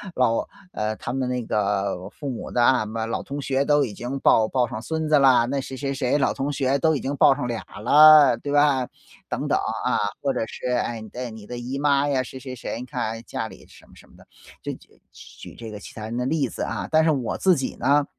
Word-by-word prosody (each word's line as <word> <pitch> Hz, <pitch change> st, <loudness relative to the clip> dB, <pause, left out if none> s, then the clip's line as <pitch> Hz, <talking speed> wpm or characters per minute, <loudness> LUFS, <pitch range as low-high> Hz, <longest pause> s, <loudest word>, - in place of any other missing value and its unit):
老 115 Hz, -3 st, +1 dB, 0.3 s
呃， 110 Hz, 0 st, -2 dB
他 120 Hz, -, -6 dB
们 130 Hz, -1 st, -1 dB
那 125 Hz, -1 st, -2 dB
个 100 Hz, -3 st, -1 dB
父 140 Hz, +5 st, -7 dB
母 125 Hz, -, -6 dB
的 120 Hz, -, +2 dB
啊， 130 Hz, +1 st, +5 dB
什 -, -, -2 dB
么 110 Hz, +1 st, -3 dB
老 115 Hz, -, -3 dB
同 140 Hz, +1 st, -5 dB
学 135 Hz, 0 st, 0 dB
都 145 Hz, 0 st, +3 dB
已 105 Hz, -, -7 dB
经 125 Hz, +6 st, -5 dB
抱 110 Hz, -4 st, +4 dB
抱 125 Hz, 0 st, +1 dB
上 110 Hz, -1 st, -6 dB
孙 160 Hz, +3 st, -3 dB
子 150 Hz, -1 st, +5 dB
了， 130 Hz, -3 st, +5 dB
那 140 Hz, +2 st, -1 dB
谁 135 Hz, -, -7 dB
谁 140 Hz, 0 st, -2 dB
谁 135 Hz, 0 st, 0 dB
老 140 Hz, -, +1 dB
同 140 Hz, +2 st, -2 dB
学 135 Hz, 0 st, 0 dB
都 160 Hz, +3 st, +2 dB
已 140 Hz, -, -1 dB
经 140 Hz, +2 st, -3 dB
报 135 Hz, -, +6 dB
上 125 Hz, -, -3 dB
俩 120 Hz, -1 st, -3 dB
儿 -, -, -11 dB
了， 145 Hz, 0 st, +7 dB
对 145 Hz, -, -5 dB
吧？ 145 Hz, -3 st, +3 dB, 0.4 s
等 -, -, -3 dB
等， -, -, +2 dB, 0.3 s
啊， -, -, +1 dB, 0.2 s
或 140 Hz, -1 st, 0 dB
者 -, -, -1 dB
是， -, -, -6 dB
哎， 120 Hz, -2 st, -1 dB
你 110 Hz, -, -10 dB
的 125 Hz, +3 st, -6 dB
你 110 Hz, -2 st, -11 dB
的 125 Hz, -, -6 dB
姨 125 Hz, +3 st, -5 dB
妈 140 Hz, 0 st, +2 dB
呀， 135 Hz, -3 st, +1 dB
谁 130 Hz, +1 st, -9 dB
谁 130 Hz, -1 st, -7 dB
谁， 115 Hz, -, -5 dB
你 125 Hz, -, -6 dB
看， 125 Hz, -1 st, -5 dB
哎， 115 Hz, +1 st, -4 dB
家 -, -, -4 dB
里 -, -, -14 dB
什 -, -, -18 dB
么 -, -, -22 dB
什 -, -, -18 dB
么 -, -, -22 dB
的， -, -, -18 dB, 0.4 s
就 -, -, -4 dB
举 -, -, -18 dB
举 -, -, -13 dB
这 115 Hz, -1 st, -8 dB
个 105 Hz, -, -8 dB
其 -, -, -11 dB
他 110 Hz, -, -8 dB
人 115 Hz, -, -5 dB
的 125 Hz, -, -1 dB
例 145 Hz, 0 st, 0 dB
子 -, -, -8 dB
啊。 -, -, -3 dB
但 160 Hz, 0 st, +4 dB
是 160 Hz, -, +3 dB
我 130 Hz, -5 st, -2 dB
自 185 Hz, -2 st, +4 dB
己 135 Hz, -, -3 dB
呢 145 Hz, +1 st, +2 dB
130 Hz, 285 characters per minute, -24 LUFS, 115-140 Hz, 0.4 s, 了